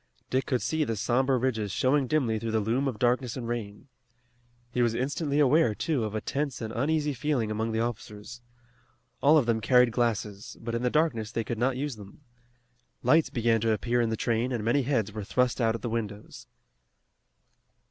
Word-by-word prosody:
Dick 130 +1 0
could 125 -3 0
see 160 -1 0
the 115 -6 -2
somber 130 +5 +1
ridges 110 -5 -1
showing 130 +6 +2
dimly 120 -7 +1
through 115 +1 -4
the 110 0 +1
loom 120 +6 0
of 125 -5 -3
darkness 125 +1 0
and 120 -2 -5
rain. 110 -3 -5 0.8
He 125 - 0
was 115 -1 +2
instantly 140 +3 -1
aware, 145 -4 +4
too, 145 -3 -1
of 105 0 -5
a 110 - -1
tense 140 -2 -3
and 110 -1 -5
uneasy 150 +3 0
feeling 125 -5 -1
among 110 +1 -1
the 110 0 0
officers. 115 0 -6 0.8
All 150 +3 +6
of 140 - +3
them 115 -1 +1
carried 125 +1 +4
glasses, 110 -4 -2
but 115 0 -5
in 115 - -1
the 125 - +1
darkness 125 -8 0
they 115 - -2
could 115 0 -4
not 125 +1 +1
use 140 -3 -3
them. 100 +7 -13 0.8
Lights 155 +6 +4
began 115 -2 +1
to 115 0 +2
appear 120 +3 0
in 115 - +1
the 110 - -2
train 115 +3 0
and 120 -4 -2
many 120 +6 +2
heads 120 -6 0
were 105 0 -5
thrust 125 +4 0
out 115 -1 +2
at 115 - -7
the - - -1
windows. 105 -2 -5
120 Hz, 200 wpm, -28 LUFS, 110-130 Hz, 0.8 s, All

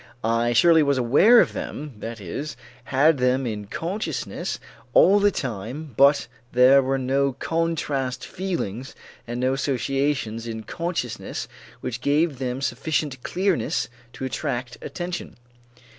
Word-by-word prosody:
I 115 +1 +2
surely 165 +6 +6
was 140 -2 +2
aware 145 - +6
of - - 0
them, 150 -1 -5
that 115 +1 -6
is, 115 - -5 0.3
had 140 +2 +3
them 125 +1 +2
in 105 -3 -4
consciousness 185 - -3 0.4
all 200 +2 +7
the 205 0 +5
time 130 - -5
but 140 +3 +5 0.3
there 130 +3 +7
were 135 +1 0
no 135 +1 +1
contrast 140 -4 -2
feelings 135 - -4 0.3
and 120 +1 -4
no 130 +1 +2
associations 135 -3 -1
in 110 -1 -5
consciousness 165 -9 -4 0.3
which 125 0 -4
gave 145 -1 +1
them 130 0 -3
sufficient 140 0 -1
clearness 185 - 0 0.2
to 130 - -5
attract 125 -1 -3
attention. 175 0 -5
135 Hz, 130 wpm, -24 LUFS, 120-155 Hz, 0.4 s, all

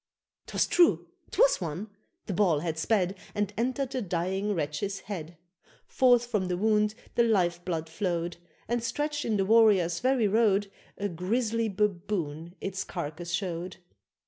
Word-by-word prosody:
'Twas - - +1
true! 345 -1 +4 0.2
'twas - - +3
one! 170 +5 -4 0.4
the 200 - -3
ball 175 -6 +2
had 165 -1 -2
sped, 185 +2 +1 0.2
And 205 -1 -1
entered 255 +3 -1
the 260 -2 -2
dying 190 +2 -1
wretch's 170 +6 -2
head; 170 -5 -7 0.5
Forth 245 -2 +4
from 210 -6 -1
the 180 -1 -1
wound 210 +1 +2 0.2
the - - +3
life 180 -7 +2
blood 165 -3 -2
flowed, 170 -1 -2 0.3
And, 240 +1 0
stretched 295 +5 -2
in 215 -2 +1
the 195 - +1
warriors' 200 -6 +4
very 255 -3 +2
road, 205 -2 +2 0.3
A 205 - -1
grisly 220 +5 -1
baboon 180 -5 -2
its 195 -1 -3
carcase 170 0 -5
showed! 180 -1 -3
195 Hz, 145 wpm, -28 LUFS, 175-225 Hz, 0.5 s, true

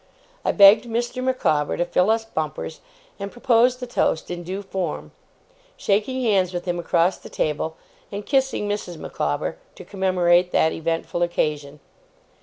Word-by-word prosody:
I - - +2
begged 205 +3 +7
Mr. 240 +2 -2
Micawber 155 - +1
to 175 - +1
fill 180 +3 +2
us 225 0 +1
bumpers, 155 -4 -4 0.4
and 200 0 -5
proposed 245 +1 +3
the 250 - -4
toast 175 -9 -1
in 175 0 -4
due 190 +4 -5
form: 190 -1 -4 0.7
shaking 220 +6 0
hands 190 -5 +2
with 175 - -4
him 175 -1 -2
across 170 +1 +1
the - - -12
table, 160 +1 -2 0.3
and 205 +1 -5
kissing 265 -6 +1
Mrs. 205 -4 -4
Micawber, - - -3 0.2
to - - -11
commemorate 180 -2 +2
that 160 - +3
eventful 165 +1 -2
occasion. 150 -4 -1
190 Hz, 150 wpm, -23 LUFS, 170-225 Hz, 0.7 s, begged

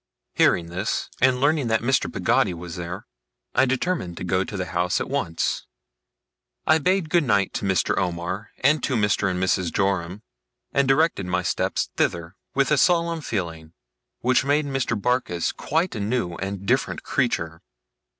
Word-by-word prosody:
Hearing 85 -1 +3
this, 90 +5 -2
and 130 0 +4
learning 145 -1 +2
that 115 0 +1
Mr. 130 +1 +1
Peggotty 90 - +1
was 85 0 -7
there, 85 0 -6 0.5
I 130 - +4
determined 130 - -1
to - - -5
go 95 +1 +1
to 100 - -6
the 90 - -2
house 90 0 0
at - - -4
once. 80 0 -1 1.0
I 155 0 +4
bade 185 +2 +1
good 175 -2 +4
night 100 -7 +1
to - - -3
Mr. 95 -2 +1
Omer, 90 +3 -3
and 145 +3 +4
to 135 - 0
Mr. 105 -3 +2
and 90 -1 -2
Mrs. 90 -2 +1
Joram; 95 0 -1 0.5
and 140 -1 +2
directed 135 - +2
my 90 0 0
steps - - -1
thither, 85 +1 -1 0.2
with 140 +1 +2
a 150 - +4
solemn 170 -1 +2
feeling, 85 - -4 0.5
which 125 0 +3
made 145 +2 +2
Mr. 135 -5 -1
Barkis 125 -7 0
quite 165 +4 -1
a 110 - -4
new 105 -3 -1
and 95 0 -5
different - - 0
creature. 80 0 -1
100 Hz, 165 wpm, -24 LUFS, 90-135 Hz, 1.0 s, and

